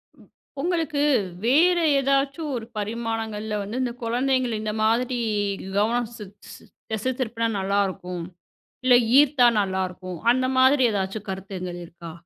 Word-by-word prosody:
ம். - - -20 0.3
உங்களுக்கு, 320 -3 0 0.4
வேற 340 +8 +4 0.2
ஏதாச்சும் 275 +3 0
ஒரு 225 -1 -6
பரிமாணங்கள்ல 220 -1 -3
வந்து, 225 +6 -4
இந்த 245 -2 -1
குழந்தைங்கள 255 +1 0
இந்த 215 -1 -2
மாதிரி, 240 +2 +1 0.6
கவனம் 230 +2 +1
செ 210 - -8 0.3
செ - - -15 0.3
திசை 220 +4 -1
திருப்புனா 230 -1 -1
நல்லா 200 +1 +1
இருக்கும், 180 -2 -6 0.6
இல்ல 250 -1 +7 0.2
ஈர்த்தா 275 -4 +5
நல்லா 190 -1 -1
இருக்கும், 180 -2 -8
அந்த 255 0 0
மாதிரி 260 +1 +5
எதாச்சும் 195 +1 -3
கருத்துங்கள் 185 -2 -6
இருக்கா? 170 0 -11
230 Hz, 130 wpm, -24 LUFS, 200-260 Hz, 0.6 s, இல்ல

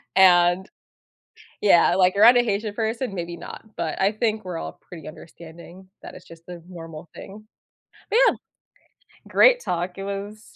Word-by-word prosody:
and 180 0 +4 0.9
Yeah, 175 -4 +4
like, 185 0 +3
around 230 +5 +7
a - - +4
Haitian 210 -1 -3
person, 225 0 -3
maybe 170 -1 -5
not, - - -10
but 160 -2 -4
I 195 +2 +2
think 215 -1 -2
we're 180 - -5
all - - -8
pretty 165 -5 -12
understanding 170 +3 -14
that - - -10
it's - - -14
just 165 0 -16
the 175 -2 -10
normal 165 -2 -10
thing. 210 +2 -12 0.6
But, 445 - +1
yeah. - - +2 0.9
Great - - +5
talk. 180 - -4
It 195 - -6
was 200 +2 -8
190 Hz, 160 wpm, -23 LUFS, 170-215 Hz, 0.9 s, around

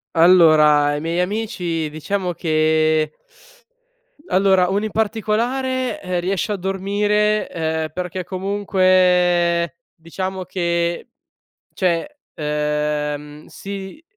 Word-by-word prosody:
Allora, 160 -4 +6
ai 145 0 -2
miei 165 +2 -1
amici 180 -5 -2
diciamo 180 +4 -3
che 155 -1 +1 1.2
allora, 190 -1 +3
uno 200 +3 0
in 215 - -4
particolare, 240 +4 -1
ehm, 180 -1 -2
riesce 190 +3 -1
a - - -1
dormire, 205 +3 0
uhm, 160 -1 -2
perché 180 +1 -4
comunque 180 -3 +2 0.2
diciamo 185 +3 -5
che 170 +1 -2 0.6
cioè, 185 - -1 0.2
uhm, 150 0 -2
si 195 - -8
180 Hz, 95 wpm, -20 LUFS, 160-200 Hz, 1.2 s, Allora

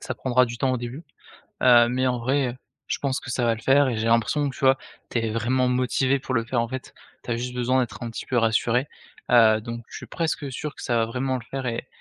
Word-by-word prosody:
Ça - - -5
prendra 125 -1 +2
du 120 0 -6
temps 130 +1 +1
au - - +1
début, 120 +6 -7 0.6
heu, 120 -1 +7
mais 130 +2 0
en 125 -1 0
vrai, 130 0 0 0.3
je - - -2
pense 135 -1 -1
que 120 - -8
ça 120 0 0
va 115 -1 +3
le 110 - -10
faire 135 +3 +4
et 120 - -1
j'ai 110 +1 -2
l'impression 115 +6 +2
que 130 - -6
tu - - -11
vois, 135 0 +5 0.3
tu 120 - 0
es 115 -1 -1
vraiment 125 +3 +1
motivé 130 +2 +1
pour 130 - -4
le 115 -1 +1
faire, 120 0 0
en 115 - -1
fait, 130 0 -7 0.3
tu - - -6
as 115 - +1
juste 125 +1 -4
besoin 125 +1 +1
d'être 125 - -4
un 115 - -4
petit - - -7
peu 125 - -1
rassuré, 115 +3 +2 0.4
heu, 110 -3 +6
donc 115 0 -7
je - - -9
suis - - -9
presque 160 -4 -2
sûr 150 +4 -5
que - - -11
ça 120 -2 0
va 115 -1 +2
vraiment 130 +2 -2
le 120 - -7
faire 135 -1 -4
et 115 -1 -3
125 Hz, 270 wpm, -24 LUFS, 115-130 Hz, 0.6 s, heu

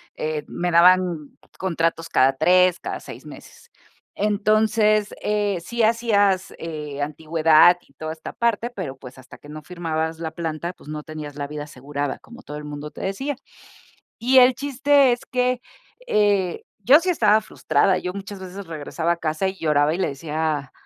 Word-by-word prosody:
eh, 155 -1 -3
me 175 0 -2
daban 175 -3 +3 0.2
contratos 165 -2 -1
cada 135 +1 +4
3, 180 +4 +4
cada - - -4
6 - - -11
meses. - - -13 0.5
Entonces, 215 0 +2
eh, 205 -3 0
sí 235 +5 -2
hacías, 205 -4 +2
eh, 150 -3 -5
antigüedad 160 +3 +4
y 140 - -27
toda 155 +3 -6
esta 160 - -9
parte, 235 +1 0
pero, 170 - -6
pues, 130 -1 -12
hasta 130 - -14
que - - -16
no 155 +1 -8
firmabas 160 -1 -3
la 160 -1 -5
planta, 170 +1 -4
pues, 150 - -16
no 150 -1 -5
tenías 155 -2 -8
la 145 -1 -4
vida 150 0 -6
asegurada, 145 +1 -5
como 235 +3 -15
todo 150 -11 -8
el 150 - -8
mundo 150 0 -7
te - - -11
decía. 265 +10 -3 0.8
Y 255 +3 +4
el 250 0 +7
chiste 280 0 +3
es 240 - -3
que, 250 0 0 0.5
eh, 200 -4 +1 0.2
yo 265 +10 +7
sí 360 +2 -4
estaba 220 -10 +4
frustrada, 190 -3 +1
yo 180 - -4
muchas 200 0 -8
veces 190 +1 -8
regresaba 165 +1 -2
a - - -2
casa 160 +4 -1
y 190 0 -3
lloraba 150 -1 +2
y 175 - -4
le - - 0
decía 150 -1 -3
175 Hz, 175 wpm, -22 LUFS, 155-210 Hz, 0.8 s, el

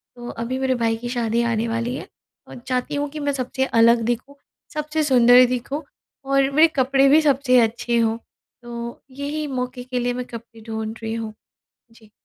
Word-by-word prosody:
तो 240 0 -8
अभी 240 +3 -4
मेरे 265 -1 +1
भाई 230 -2 +1
की 240 +1 -6
शादी 235 -1 0
आने 225 +1 0
वाली 230 +2 -2
है - - -7 0.4
और - - -10
चाहती 255 +2 -1
हूँ 290 0 -1
कि 305 - -7
मैं 285 -1 -1
सबसे 265 0 -1 0.2
अलग 230 0 +5
दिखूँ, 245 +4 -3 0.4
सबसे 305 +1 -1
सुंदर 250 -2 +6
दिखूँ 255 +5 -3 0.4
और 275 0 +2
मेरे 310 +4 +6
कपड़े 270 +1 +3
भी 310 +3 +6
सबसे 270 -3 +3
अच्छे 235 +1 0
हों, 225 0 +1 0.4
तो 235 0 -7
यही 290 +3 -4
मौके 250 -2 -4
के 250 0 -3
लिए 245 0 0
मैं 250 0 -4
कपड़े 230 -1 -11
ढूँढ़ 220 0 -4
रही 225 0 -3
हूँ, 225 -1 -4 0.6
जी। 220 -2 -20
250 Hz, 185 wpm, -22 LUFS, 230-275 Hz, 0.6 s, सुंदर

